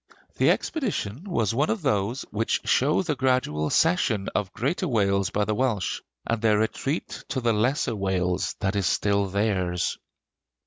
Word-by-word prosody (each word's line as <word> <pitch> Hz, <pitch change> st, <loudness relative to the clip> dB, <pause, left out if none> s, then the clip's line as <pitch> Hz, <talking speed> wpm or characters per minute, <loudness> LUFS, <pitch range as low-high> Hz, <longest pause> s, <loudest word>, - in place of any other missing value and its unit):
The -, -, +4 dB
expedition 185 Hz, -, -1 dB
was 115 Hz, -, 0 dB
one 140 Hz, +6 st, +1 dB
of 220 Hz, -6 st, -1 dB
those 115 Hz, -1 st, 0 dB
which 110 Hz, +2 st, 0 dB
show 150 Hz, +8 st, +3 dB
the 160 Hz, -5 st, -1 dB
gradual 130 Hz, -, +1 dB
cession 140 Hz, -, +2 dB
of 100 Hz, -3 st, -1 dB
greater 170 Hz, +9 st, -1 dB
Wales 100 Hz, -, +1 dB
by 105 Hz, +1 st, 0 dB
the 110 Hz, -, 0 dB
Welsh, 110 Hz, -5 st, -1 dB, 0.2 s
and 115 Hz, -1 st, -1 dB
their 110 Hz, -2 st, +4 dB
retreat 135 Hz, +8 st, -2 dB
to 140 Hz, -, -1 dB
the 120 Hz, -2 st, +2 dB
lesser 120 Hz, +2 st, +1 dB
Wales 90 Hz, -2 st, -1 dB
that 95 Hz, +1 st, 0 dB
is 100 Hz, -3 st, +1 dB
still 100 Hz, -1 st, +1 dB
theirs. 95 Hz, -3 st, 0 dB
110 Hz, 160 wpm, -25 LUFS, 100-135 Hz, 0.2 s, The